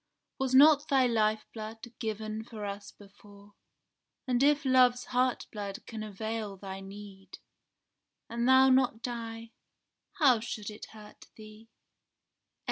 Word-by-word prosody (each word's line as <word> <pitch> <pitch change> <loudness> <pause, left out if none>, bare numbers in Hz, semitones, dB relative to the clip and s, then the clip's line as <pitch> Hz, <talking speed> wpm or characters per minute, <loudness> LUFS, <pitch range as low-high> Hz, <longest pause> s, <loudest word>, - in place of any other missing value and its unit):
Was 260 -1 0
not 295 +2 +7
thy 270 -4 +3
lifeblood 220 0 -2
given 220 -1 -4
for 220 -2 -8
us 200 0 -6
before? 205 0 -18 0.7
And 250 -1 +1
if 290 +1 +3
love's 250 -1 +4
heartblood 240 -5 -2
can 225 -2 -7
avail 215 0 -5
thy 190 0 -7
need, 195 -1 -11 0.9
And 235 +1 -2
thou 260 0 +7
not 255 -3 +2
die, 230 -1 -6 0.6
how 275 - +4
should 215 -2 -6
it 210 - -10
hurt 210 -1 -14
indeed? 215 +1 -15
225 Hz, 120 wpm, -30 LUFS, 210-250 Hz, 0.9 s, not